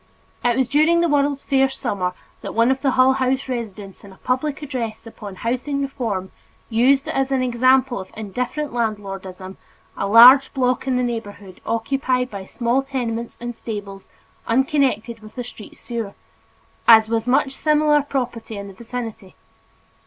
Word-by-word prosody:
It 240 0 +2
was 260 -2 +2
during 310 +5 +3
the 340 - +3
World's 285 -2 +1
Fair 270 -1 +2
summer 200 -9 -3 0.3
that - - -7
one 230 +3 +4
of 265 0 -1
the 275 - +2
Hull 260 +1 +6
House 265 0 0
residents 215 -6 -6
in 200 - -12
a 190 - -16
public 280 +4 -2
address 235 -6 -5
upon 210 -3 -9
housing 255 +7 -2
reform 225 -9 -3 0.4
used 265 +5 +3
as 270 0 -1
an 265 -1 +1
example 255 0 +2
of 190 - -8
indifferent 250 +7 -4
landlordism 195 -5 -4 0.4
a 195 - -2
large 250 +7 +8
block 255 0 0
in 255 -1 +1
the 250 - +1
neighborhood 205 -5 -6
occupied 250 +2 0
by 200 -2 -7
small 240 +5 0
tenements 235 -4 -4
and 240 0 -5
stables 205 -4 -7 0.4
unconnected 255 -2 +1
with 215 +1 -15
a 245 - -3
street 225 -3 -12
sewer, 230 -4 -5 0.7
as 220 -1 +8
was 225 +1 -1
much 265 +2 +2
similar 300 +1 +3
property 245 -6 -4
in 200 0 -6
the 195 - -10
vicinity. 225 -3 -7
240 Hz, 160 wpm, -21 LUFS, 220-265 Hz, 0.7 s, large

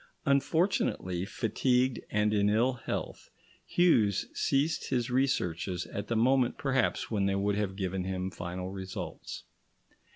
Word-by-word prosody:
Unfortunately, 140 - +1
fatigued 125 +4 +1
and 105 0 +1
in 105 -1 +3
ill 115 +5 +3
health, 120 - -5 0.4
Hughes 115 - +3
ceased 145 +4 0
his 125 -1 0
researches 90 -9 0
at 100 0 -5
the 115 - -1
moment 125 +2 +3
perhaps 135 -6 0
when 100 -3 +1
they 100 - +1
would 100 +1 +1
have 100 -2 -1
given 95 -1 -2
him 95 0 -3
final 90 +1 -5
results. 95 -1 -6
105 Hz, 130 wpm, -30 LUFS, 95-130 Hz, 0.4 s, in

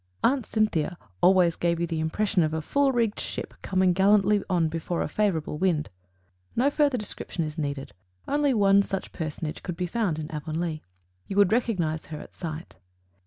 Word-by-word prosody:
Aunt 260 -2 +2
Cynthia 180 -6 0 0.2
"always 180 -2 +5
gave 170 -1 0
you 170 - +1
the 165 -1 -3
impression 185 +5 +1
of 155 -1 +1
a 160 - -1
full 280 - +2
rigged 230 -4 0
ship - - -5
coming 185 -1 +2
gallantly 200 +2 +4
on 175 -3 +2
before 165 +2 -2
a - - -2
favorable 165 -8 -1
wind;" 165 - +1 0.6
no 270 +4 +3
further 290 -3 +2
description 200 -5 -4
is 155 -1 -5
needed 140 -2 -3 0.3
only 290 0 +2
one 200 -1 +5
such 195 -1 -4
personage 155 -1 -5
could 175 -3 -5
be 180 - -1
found 180 -3 -1
in 155 0 -5
Avonlea. 155 +1 -3 0.5
You 195 - -4
would 205 -2 +5
recognize 185 -10 0
her 155 -1 -6
at - - -12
sight. 160 - -7
180 Hz, 175 wpm, -26 LUFS, 160-210 Hz, 0.6 s, always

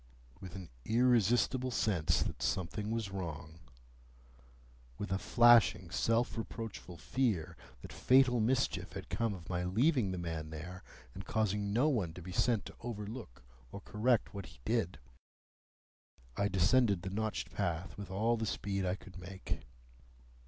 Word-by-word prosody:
With 95 -1 -9
an 95 -4 -8
irresistible 120 - +3
sense 100 -8 +1
that - - -5
something 105 +4 -1
was 110 -3 -2
wrong,—with - - -10
a 95 - +1
flashing 120 -8 +5
self 115 +4 +1
reproachful 110 -6 -6
fear 100 - -1 0.3
that - - -9
fatal 130 -1 +4
mischief 120 +4 0
had - - -7
come 115 -3 0
of 85 -2 -11
my 90 -1 -1
leaving 115 - +2
the 90 - -3
man 80 -3 -4
there, 85 +4 -7 0.3
and 95 - -7
causing 105 -1 0
no 120 +8 +3
one 105 - 0
to 90 - -8
be 90 - -7
sent 110 +2 +1
to - - -9
overlook 105 - -7 0.3
or - - -6
correct 110 +2 +1
what 100 -2 -6
he 65 - -16
did,—I 70 0 -6
descended 100 +1 +3
the 95 - -4
notched 110 +2 -2
path 90 -2 -2
with 100 -2 -7
all 110 +5 +1
the 110 -1 -2
speed 100 0 -2
I 90 - +1
could 95 -2 -12
make. 95 +1 -5
95 Hz, 145 wpm, -34 LUFS, 85-115 Hz, 0.3 s, flashing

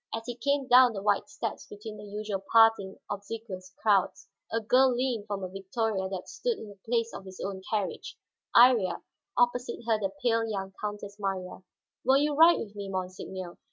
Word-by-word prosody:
As 225 - -5
he 245 - -4
came 275 +3 0
down 250 -1 +7
the 195 - -5
wide 205 +6 +1
steps 235 -7 -5
between 210 +1 -9
the 210 - -10
usual 205 -1 -4
parting, 225 -4 +5
obsequious 200 -2 -6
crowds, 200 -4 +2 0.2
a 230 - +1
girl 250 +3 +4
leaned 240 -4 -1
from 200 -2 -4
a - - -2
victoria 195 +1 -2
that 190 -1 -5
stood 480 -2 -2
in 220 - -9
the 200 -1 -14
place 230 0 0
of - - -7
his 190 -1 -11
own 195 -1 -4
carriage, 210 -3 -3 0.4
Iría, 235 -6 +5 0.3
opposite 245 0 +1
her 225 -2 +2
the 195 -2 -2
pale 230 -2 +3
young 195 -2 -4
Countess 205 -1 -5
Marya. 190 -3 -3 0.4
"Will 265 +1 +5
you 295 +1 +2
ride 330 +4 +7
with 210 -2 -6
me, 200 -1 -6
monseigneur?" 185 -1 -5
210 Hz, 185 wpm, -29 LUFS, 195-235 Hz, 0.4 s, down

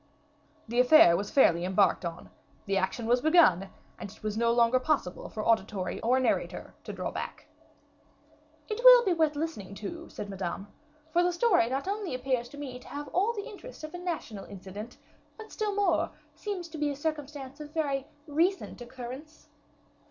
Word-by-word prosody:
The 235 +2 -1
affair 250 - +7
was 200 +3 -2
fairly 170 -11 +4
embarked 190 +2 +2
on; 170 0 -6 0.3
the 195 - 0
action 195 +5 -1
was 245 +2 +3
begun, 300 - +5 0.3
and - - -6
it 205 - -16
was 215 -1 -2
no 230 +1 +2
longer 235 +1 +4
possible 255 - -1
for 215 - -5
auditory 195 -5 0
or 250 +3 +3
narrator 255 - -1
to - - -5
draw - - -4
back. - - -6 1.2
"It 435 +1 -3
will - - +9
be 375 - +3
worth 315 -3 +2
listening 290 - -4
to," 335 +12 -7
said 205 - -7
Madame; 195 0 -4 0.5
"for 345 - +4
the 355 0 +2
story 350 - +3
not 270 +6 -2
only 400 -7 -2
appears 255 -2 -1
to 285 - -12
me 260 -4 -6
to - - -16
have 290 0 -6
all 410 +6 +1
the 410 -3 -5
interest 430 -1 -11
of 310 +2 -7
a 355 - -6
national 320 - -5
incident, 200 +4 -9 0.4
but 440 -1 -11
still 425 -2 -2
more, 410 0 +2 0.2
seems 390 -5 -5
to 315 -1 -8
be 295 -1 +1
a 285 - -3
circumstance 290 -2 -5
of 300 0 -8
very 280 -4 -1 0.2
recent 330 0 0
occurrence." 260 +5 -9
270 Hz, 180 wpm, -29 LUFS, 215-335 Hz, 1.2 s, will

